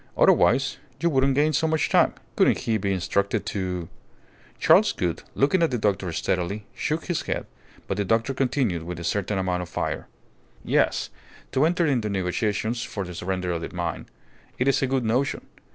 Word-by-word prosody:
Otherwise 135 0 +4 0.2
you 170 0 +1
wouldn't 135 -1 +3
gain 150 +2 +3
so 160 - +2
much 160 -1 +1
time. - - +3 0.2
Couldn't - - +4
he 110 -1 0
be 100 0 -1
instructed 100 +2 0
to 90 -4 -3 0.4
" - - -29
Charles - - +5
Gould, 85 -2 -2
looking 145 +7 +3
at 165 - +4
the 125 - -1
doctor 100 -4 0
steadily, 95 +5 -2
shook 155 +5 -2
his 175 -3 -1
head, - - -3 0.4
but 95 - -3
the 100 - +1
doctor 115 +6 +1
continued 125 - 0
with 85 +1 -6
a - - -6
certain 100 +3 -1
amount 90 -1 0
of 90 - -7
fire - - -3 0.6
"Yes, - - +1 0.4
to 135 +3 +3
enter 175 0 +1
into 125 -8 +1
negotiations 105 +4 -1
for 100 -4 -4
the 90 - -7
surrender 90 +1 -2
of 85 -1 -2
the - - -6
mine. 85 -2 -3 0.5
It 125 - 0
is 135 - +3
a 135 - +2
good 130 -2 0
notion. 125 +5 0
105 Hz, 185 wpm, -25 LUFS, 90-135 Hz, 0.6 s, Charles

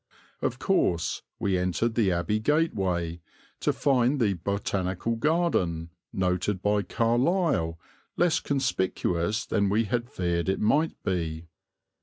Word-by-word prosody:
Of - - -1
course, 85 -1 +1 0.2
we 95 -2 0
entered 90 +6 0
the 110 -5 +2
Abbey 90 +5 0
Gateway, 95 - 0 0.4
to - - +2
find 135 0 +2
the 105 -5 +3
Botanical 95 +3 -2
Garden, 115 - 0 0.2
noted 90 +1 0
by 105 0 +2
Carlyle, 120 - +1 0.4
less 175 -2 +3
conspicuous 105 -6 0
than 100 -2 +1
we 105 +3 +2
had 120 +3 -2
feared 85 -6 -1
it 95 - 0
might 150 +9 +2
be. 85 -3 -2
100 Hz, 120 wpm, -27 LUFS, 90-120 Hz, 0.4 s, the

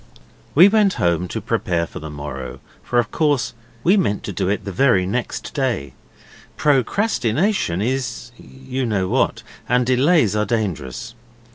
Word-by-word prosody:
We 175 +6 +9
went 205 -2 +3
home 85 -1 +2
at 85 - -2
once 90 0 -5
to - - -3
prepare 85 -2 0
for - - -9
the 80 - -7
morrow, 70 -4 -7 0.2
for 120 - -2
of 120 -3 +1
course 150 -5 +1 0.3
we 190 +4 +4
meant 105 - 0
to 100 - -5
do 90 - -1
it 105 - -1
the 100 - -4
very 95 -3 +3
next 120 +6 -3
day. 120 - -1 0.6
Procrastination 135 - +1
is 120 -1 -3
you 130 0 -6
know 100 -4 0
what - - 0 0.3
and 125 +1 +3
delays 130 - +3
are 105 - +2
dangerous. 110 - -3
120 Hz, 160 wpm, -21 LUFS, 95-135 Hz, 0.6 s, We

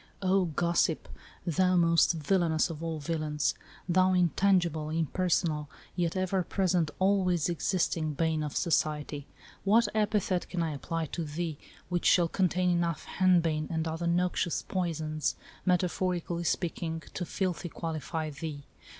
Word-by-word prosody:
O 190 0 +3
Gossip, 170 0 +1 0.4
thou 180 +2 +2
most 170 0 +4
villainous 165 0 +1
of 160 -1 -7
all 165 -1 -2
villains, 150 -3 -1 0.3
thou 185 +1 +4
intangible, 175 -3 +2
impersonal, 160 -1 0 0.3
yet 175 -1 0
ever 185 0 +1
present, 180 -3 +1
always 185 -4 +2
existing 165 -2 0
bane 160 +1 +1
of 150 -2 -4
society, 150 -3 0 0.4
what 225 +4 +4
epithet 210 -4 0
can 175 -2 -1
I 160 - -1
apply 165 +3 -3
to 165 +2 -4
thee 155 0 -4 0.3
which 175 -1 0
shall 175 -2 +5
contain 180 0 +1
enough 170 -2 0
hen 185 -2 +3
bane 155 -2 -1
and 160 -1 -1
other 165 +2 -2
noxious 175 0 +1
poisons, 160 -4 -2 0.3
metaphorically 180 -1 0
speaking, 165 -1 -2
to 180 - -3
fitly 180 -1 -2
qualify 160 -1 -4
thee 145 0 -6
170 Hz, 135 wpm, -30 LUFS, 160-180 Hz, 0.4 s, shall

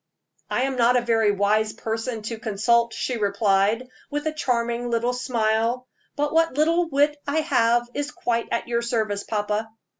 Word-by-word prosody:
"I 250 - 0
am 265 -1 -1
not 245 +1 +4
a - - +2
very 225 -2 +2
wise 210 +2 +1
person 225 0 -4
to 225 +1 -5
consult," 235 +2 +2
she 250 +1 -3
replied, 205 +2 +1 0.2
with 295 +1 -3
a 310 - -1
charming 240 -4 -1
little 235 +1 0
smile, 235 0 0 0.3
"but 295 +1 -1
what 330 -4 +2
little 330 +2 +2
wit 290 0 +2
I 305 +3 +1
have 240 -6 +2
is 290 0 -2
quite 235 -4 -2
at 235 - -1
your 235 0 0
service, 220 -4 -1
papa." 210 0 -2
235 Hz, 170 wpm, -24 LUFS, 220-255 Hz, 0.3 s, not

